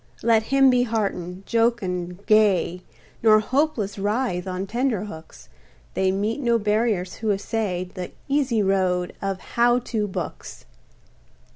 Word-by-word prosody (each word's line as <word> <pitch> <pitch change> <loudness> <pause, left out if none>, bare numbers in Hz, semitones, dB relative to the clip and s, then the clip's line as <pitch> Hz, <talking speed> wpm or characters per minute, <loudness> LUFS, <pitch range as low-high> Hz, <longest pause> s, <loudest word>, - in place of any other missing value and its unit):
Let 225 -1 +4
him 270 0 +5
be 250 -1 +3
heartened, 195 -5 -2
jocund, 195 -6 -1
gay, 195 -5 +3 0.4
Nor 215 -1 +6
hopeless 225 -5 -1
writhe 205 -3 -1
on 185 +1 -3
tenter 230 -1 -1
hooks, 160 -6 -11 0.5
They 190 0 +1
meet 210 +6 -1
no 235 -2 +3
barriers 210 -3 0
who 220 - -2
essay 200 -2 -2
The 180 0 -7 0.2
easy 270 -6 +1
road 185 -2 +1
of 195 -1 -2
"How 240 +4 +2
To" 225 -4 -2
books! 190 - -6
210 Hz, 130 wpm, -23 LUFS, 185-235 Hz, 0.5 s, Nor